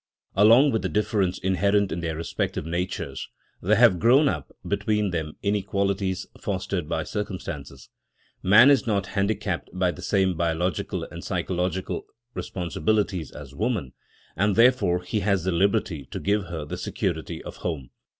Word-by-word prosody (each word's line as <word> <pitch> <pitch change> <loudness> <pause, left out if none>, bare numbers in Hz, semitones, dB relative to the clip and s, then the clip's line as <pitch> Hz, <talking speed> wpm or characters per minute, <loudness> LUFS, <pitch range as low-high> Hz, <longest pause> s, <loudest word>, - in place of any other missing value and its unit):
Along 115 +8 +6
with 110 - 0
the - - -2
difference 100 -3 0
inherent 100 +2 +1
in 85 - -2
their 85 -2 -2
respective 80 -2 -3
natures, 85 -4 -3 0.3
there 105 +5 +3
have 110 -6 +5
grown 130 - +5
up 75 - -2 0.2
between 105 -2 0
them 80 -3 -3
inequalities 100 -2 0
fostered 95 -4 -3
by 80 -1 -1
circumstances. 80 -9 -6 0.5
Man 110 +9 +7
is 135 -3 +3
not 100 -4 +1
handicapped 100 +1 -1
by 90 0 +1
the 75 - -10
same 95 -2 +2
biological 85 +1 -1
and - - -8
psychological 90 0 -2 0.3
responsibilities 90 0 -1
as - - -11
woman, 65 -2 -2 0.4
and 100 +3 +2
therefore 115 -7 +4
he 105 +4 -1
has 100 -3 +1
the 95 - 0
liberty 85 -5 +1
to - - -6
give 100 0 0
her 80 -3 -5
the - - -5
security - - -3
of - - -8
home. 75 -8 -4
95 Hz, 150 wpm, -25 LUFS, 85-105 Hz, 0.5 s, Man